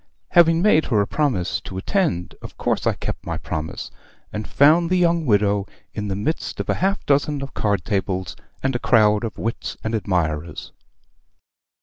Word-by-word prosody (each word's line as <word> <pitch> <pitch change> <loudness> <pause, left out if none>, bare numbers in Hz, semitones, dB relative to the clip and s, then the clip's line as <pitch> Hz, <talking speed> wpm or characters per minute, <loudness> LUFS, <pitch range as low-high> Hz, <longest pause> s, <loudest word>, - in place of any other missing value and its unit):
"Having 165 -1 +5
made 180 -7 +4
her 110 -5 +1
a 100 - +3
promise 125 - 0
to 95 - -8
attend, 95 - -1
of - - -10
course - - 0
I - - +3
kept - - -5
my - - -3
promise; 80 0 -5 0.4
and 105 0 -4
found 160 +4 +4
the 185 - +2
young 170 -3 +2
widow 100 -2 +2 0.3
in 105 -1 -4
the 95 - -2
midst 110 +12 -3
of - - -4
a - - -3
half 195 +1 0
dozen 145 0 +1
of 135 - -8
card 100 -5 0
tables, 95 -3 -2 0.3
and 135 -1 0
a - - 0
crowd 105 -3 +4
of 115 - -4
wits 115 +1 -4
and 110 - -2
admirers. 85 -7 -2
110 Hz, 180 wpm, -22 LUFS, 100-155 Hz, 0.4 s, Having